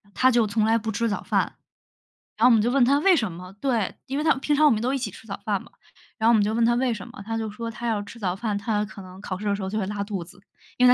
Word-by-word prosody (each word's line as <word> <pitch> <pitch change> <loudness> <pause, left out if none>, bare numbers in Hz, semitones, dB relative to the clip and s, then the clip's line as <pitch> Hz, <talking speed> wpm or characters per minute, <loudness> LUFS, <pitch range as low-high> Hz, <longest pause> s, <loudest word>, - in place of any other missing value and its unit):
她 255 0 +4
就 235 -3 +3
从 215 +1 +1
来 225 +1 +3
不 220 0 -3
吃 230 +2 0
早 205 - -2
饭。 - - -1 0.8
然 230 - +3
后 - - +8
我 - - +6
们 220 - +5
就 240 +3 +1
问 265 -2 +4
她 280 +3 +4
为 385 +3 +5
什 220 - +1
么 180 +2 -9
对， 235 -8 0
因 270 +2 -3
为 300 - 0
她 315 - +5
平 290 +2 0
常 305 +1 +4
我 295 - +7
们 215 -1 +1
都 255 +3 0
一 - - +1
起 260 - -3
吃 - - -14
早 - - -5
饭 - - 0
嘛， - - -15 0.5
然 220 - -1
后 230 - +7
我 - - +5
们 215 - +5
就 210 +2 +1
问 230 0 +2
她 235 +1 +4
为 250 -1 +1
什 205 - -7
么， - - -11
她 225 0 -2
就 220 -2 -3
说 230 +2 -5
她 230 +2 -7
要 220 -3 0
吃 230 - -11
早 185 -5 -1
饭， 210 0 -2
她 210 0 -1
可 205 -1 -11
能 185 0 -12
考 185 -2 -5
试 210 - -9
的 205 -1 +1
时 200 - -3
候 190 - -3
就 215 - -3
会 200 - 0
拉 205 -1 -3
肚 200 -4 -3
子， 190 +3 -17 0.4
因 250 0 +6
为 - - +8
220 Hz, 360 characters per minute, -25 LUFS, 205-240 Hz, 0.8 s, 后